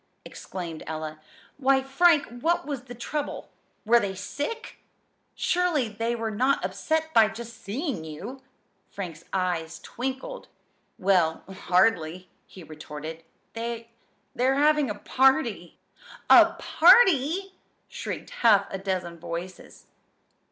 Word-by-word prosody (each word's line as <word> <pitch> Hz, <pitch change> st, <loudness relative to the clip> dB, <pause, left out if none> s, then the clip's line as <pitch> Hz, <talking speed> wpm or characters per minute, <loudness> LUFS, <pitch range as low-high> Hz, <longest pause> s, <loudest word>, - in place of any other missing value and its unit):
exclaimed 170 Hz, -4 st, -7 dB
Ella. 155 Hz, 0 st, -5 dB, 0.4 s
"Why, 270 Hz, -1 st, +3 dB
Frank, 295 Hz, +3 st, +4 dB, 0.2 s
what 340 Hz, -1 st, +1 dB
was 275 Hz, -4 st, -5 dB
the 245 Hz, -1 st, -9 dB
trouble? 290 Hz, +5 st, -5 dB, 0.3 s
Were 235 Hz, +2 st, +5 dB
they 195 Hz, -3 st, -3 dB
sick? 290 Hz, -, -5 dB, 0.6 s
Surely, 345 Hz, -9 st, +1 dB
they 230 Hz, +3 st, -2 dB
were 225 Hz, -1 st, -3 dB
not 255 Hz, 0 st, +1 dB
upset 315 Hz, +12 st, -2 dB
by 225 Hz, -2 st, +6 dB
just 230 Hz, +1 st, -9 dB
seeing 245 Hz, -, -3 dB
you!" 195 Hz, -, -8 dB, 0.5 s
Frank's 170 Hz, -5 st, -7 dB
eyes 175 Hz, -4 st, -2 dB
twinkled 265 Hz, -, -5 dB, 0.5 s
"Well, 180 Hz, -4 st, +2 dB
hardly!" 185 Hz, -2 st, +1 dB, 0.2 s
he 185 Hz, -, -12 dB
retorted. 155 Hz, +1 st, -8 dB, 0.3 s
"They 230 Hz, 0 st, -5 dB, 0.4 s
they're 260 Hz, +2 st, +2 dB
having 295 Hz, -1 st, +3 dB
a 210 Hz, -, -3 dB
party." 255 Hz, -, +1 dB, 0.5 s
"A -, -, +8 dB
party!" 370 Hz, -, +4 dB, 0.3 s
shrieked -, -, -6 dB
half 205 Hz, -4 st, +5 dB
a 195 Hz, -, -3 dB
dozen 185 Hz, -3 st, -3 dB
voices. 170 Hz, +2 st, -8 dB
225 Hz, 115 wpm, -26 LUFS, 180-275 Hz, 0.6 s, A